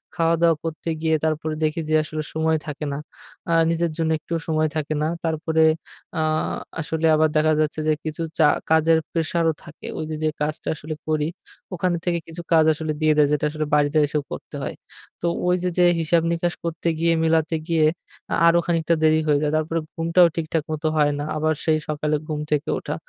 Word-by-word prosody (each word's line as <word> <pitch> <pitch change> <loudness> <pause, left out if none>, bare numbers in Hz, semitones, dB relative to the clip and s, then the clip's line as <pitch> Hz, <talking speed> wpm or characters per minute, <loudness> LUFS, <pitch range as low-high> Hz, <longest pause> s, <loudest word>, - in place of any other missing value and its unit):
খাওয়া-দাওয়া 165 -1 +3
করতে 165 +1 -4
গিয়ে 160 -1 +2
তারপরে 155 0 -1
দেখি 155 +1 0
যে 155 - +3
আসলে 155 0 -4
সময় 160 0 +1
থাকে 150 0 -4
না। - - -3 0.5
আ - - +3 0.2
নিজের 170 0 0
জন্য 160 -1 0
একটুও 165 +1 -3
সময় 155 -1 +1
থাকে 155 0 -2
না। - - +1 0.2
তারপরে 160 0 +1 0.6
আ - - +2 0.6
আসলে 160 +1 -2
আবার 155 0 +3
দেখা 155 0 +3
যাচ্ছে 155 0 -1
যে 155 - +4
কিছু 155 +1 -4 0.2
চা 155 - +6 0.3
কাজের 160 0 +5
প্রেশারও 165 0 +1
থাকে। 160 -2 -11
ওই 155 - -3
যে - - -2
যে 155 - +3
কাজটা 150 +1 -2
আসলে 155 +1 -6
করি, 155 -1 +1 0.5
ওখান 180 +1 0
থেকে 170 -1 +1
কিছু 165 +1 -7
কাজ 160 -1 +6
আসলে 155 0 -3
দিয়ে 155 0 +4
দেয় 150 -1 +5
যেটা 150 - +1
আসলে 155 0 -2
বাড়িতে 145 +1 +2
এসেও 150 0 -1
করতে - - -7
হয়। - - -4 0.5
তো 170 - 0 0.2
ওই 180 - +4
যে 180 - +1
যে 180 - +6
হিসাব 165 +1 +3
নিকাশ 170 +1 0
করতে 165 0 -3
গিয়ে 165 0 +3
মেলাতে 160 0 +2
গিয়ে 160 -2 +3 0.5
আ - - +3
আরো 170 +1 +5
খানিকটা 165 -1 +2
দেরি 155 0 +5
হয়ে 145 -1 +3
যায়। 150 - +1
তারপরে 160 +1 -1 0.2
ঘুমটাও 170 +1 +4
ঠিকঠাক 160 -1 -1
মত 155 +1 -4
হয় 145 -1 +4
না। - - -2
আবার 155 +1 +1
সেই 155 -1 +3
সকালে 150 0 -1
ঘুম 150 -1 -3
থেকে 150 0 0
ওঠা। 150 - -4
160 Hz, 200 wpm, -23 LUFS, 155-165 Hz, 0.6 s, চা